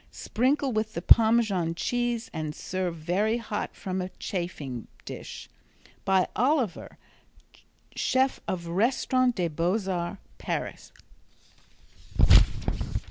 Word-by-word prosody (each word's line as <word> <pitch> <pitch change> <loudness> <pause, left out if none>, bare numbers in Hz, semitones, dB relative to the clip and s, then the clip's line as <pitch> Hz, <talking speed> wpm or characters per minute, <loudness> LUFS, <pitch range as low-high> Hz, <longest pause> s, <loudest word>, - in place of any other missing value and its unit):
Sprinkle 265 +4 0
with 215 0 -1
the 170 - -2
Parmesan 220 -8 +4
cheese 240 +3 -1
and 155 -1 -3
serve 185 -2 -3
very 185 +8 0
hot 215 -3 -4
from 185 -1 -3
a 180 - -4
chafing 160 - -4 0.2
dish. - - -8 0.6
(By 190 -2 +3
Oliver, 255 - 0 1.0
chef 265 +1 +2
of 180 -2 -2
the 170 - -6
Restaurant 250 +5 +2
des 175 -3 0
Beaux 180 +6 0
Arts, 180 0 -2 0.2
Paris.) - - -4
195 Hz, 105 wpm, -27 LUFS, 175-235 Hz, 1.0 s, Parmesan